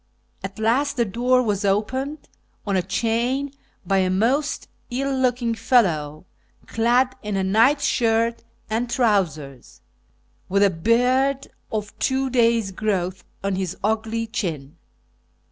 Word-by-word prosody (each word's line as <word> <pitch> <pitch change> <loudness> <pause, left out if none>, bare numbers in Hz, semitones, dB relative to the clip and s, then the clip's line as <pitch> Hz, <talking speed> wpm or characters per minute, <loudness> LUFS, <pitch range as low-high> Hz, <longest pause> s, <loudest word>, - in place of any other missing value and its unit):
At 195 +1 -6
last 260 +6 +1
the 235 - +2
door 250 +5 +2
was 205 -3 -1
opened, 260 +9 -1 0.4
on 200 -2 0
a 185 - +3
chain, 235 +8 -1 0.3
by 195 -1 +2
a 185 -1 +2
most 245 +11 0 0.2
ill 270 +2 -1
looking 250 -2 +1
fellow, 170 - +1 0.4
clad 245 +3 +2
in 210 -2 -3
a 190 - 0
night 230 +10 +3
shirt 230 -3 +1 0.2
and 230 +2 -2
trousers, 160 - -1 0.7
with 200 +2 +3
a 200 - +4
beard 250 +9 +1 0.2
of 210 -2 -4
two 265 0 0
days' 230 -4 +2
growth 190 -2 -2 0.2
on 195 -1 -1
his 190 -3 -3
ugly 220 +2 -1
chin. 165 - -4
225 Hz, 130 wpm, -23 LUFS, 195-250 Hz, 0.7 s, a